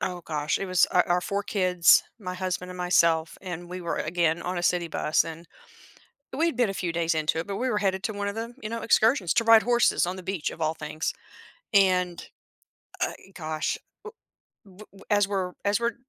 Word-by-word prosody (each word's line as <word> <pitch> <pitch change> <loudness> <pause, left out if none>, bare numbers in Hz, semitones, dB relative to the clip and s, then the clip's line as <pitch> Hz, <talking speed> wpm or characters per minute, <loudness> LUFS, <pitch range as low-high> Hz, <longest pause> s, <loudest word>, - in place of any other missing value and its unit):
Oh, 180 -2 -3
gosh, 150 -1 -1
it 195 - -3
was 185 0 +3
our 180 - +4
our 175 +1 +2
4 200 +2 -2
kids, 180 -4 +4 0.2
my 180 -3 -5
husband 185 -1 -3
and 180 - -9
myself 170 -2 +2
and 175 -2 -7
we 180 +1 -6
were, 170 -1 -3
again, 165 0 0
on 180 +1 -3
a - - -3
city 175 0 +1
bus 155 -1 +1
and 165 +1 -8 0.9
we'd 325 -4 +1
been 245 -4 +2
a - - -3
few 180 -3 -2
days 165 0 0
into 155 0 0
it, 165 - -4
but 200 - -3
we 255 +4 -1
were 215 - 0
headed 190 -2 0
to 220 - -2
one 205 0 -3
of 200 - -3
them, 230 +2 -5
you 215 - -4
know, 230 0 -4
excursions 220 - +3
to 230 - +3
ride 225 -1 +7
horses 240 -3 +3
on 180 +1 -3
the 185 - -9
beach 185 -4 -2
of - - -10
all 155 0 +1
things 155 0 -4 0.6
and, 185 -3 +2 0.7
uh - - 0
e 195 - -18
gosh, 155 -2 -3 0.3
u 440 - -7 0.5
w 190 -1 -18
w 195 - -16
as 205 -2 +3
we're 190 -3 -2
as 200 +1 +2
we're 235 0 -1
180 Hz, 220 wpm, -26 LUFS, 170-205 Hz, 0.9 s, ride